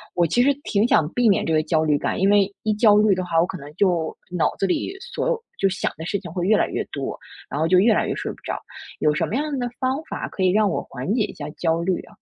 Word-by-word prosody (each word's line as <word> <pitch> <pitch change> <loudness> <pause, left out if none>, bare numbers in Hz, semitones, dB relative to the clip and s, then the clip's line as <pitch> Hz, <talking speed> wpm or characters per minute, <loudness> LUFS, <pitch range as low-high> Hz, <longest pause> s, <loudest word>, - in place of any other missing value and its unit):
我 175 -1 +3
其 245 +9 +3
实 280 +2 +4
挺 205 +1 +2
想 155 - +3
避 245 -2 +3
免 195 - +2
这 165 - 0
个 155 0 +3
焦 155 0 +1
虑 150 -2 +3
感。 - - -2
因 195 +2 +3
为 205 -1 +3
一 215 - +1
焦 210 -1 +5
虑 210 -2 +4
的 185 - -2
话， 165 -2 +1
我 165 - +4
可 185 - -6
能 145 -1 -11
就 175 -4 +1 0.2
脑 180 -2 0
子 195 - +1
里 190 - -1
所 480 +3 -4
有 480 -2 -1 0.2
就 195 - +2
想 190 - -1
的 160 - -6
事 200 +3 -1
情 180 -3 -9
会 175 +1 -2
越 215 - +5
来 - - +2
越 - - -2
多， - - -4 0.3
然 - - -4
后 160 - +2
就 185 +2 +4
越 220 +4 +5
来 - - +1
越 - - -2
睡 - - -4
不 - - -12
着， - - -3 0.4
有 150 - +3
什 - - +1
么 220 - -3
样 295 +1 -1
的 245 -1 -2
方 265 +4 -1
法 - - -5
可 190 - -3
以 185 - +4
让 210 +1 +3
我 - - -1
缓 135 +9 -4
解 230 -2 +2
一 - - -5
下 145 0 -7
焦 165 +1 0
虑 180 +1 0
啊？ - - -17
190 Hz, 315 characters per minute, -23 LUFS, 165-215 Hz, 0.4 s, 焦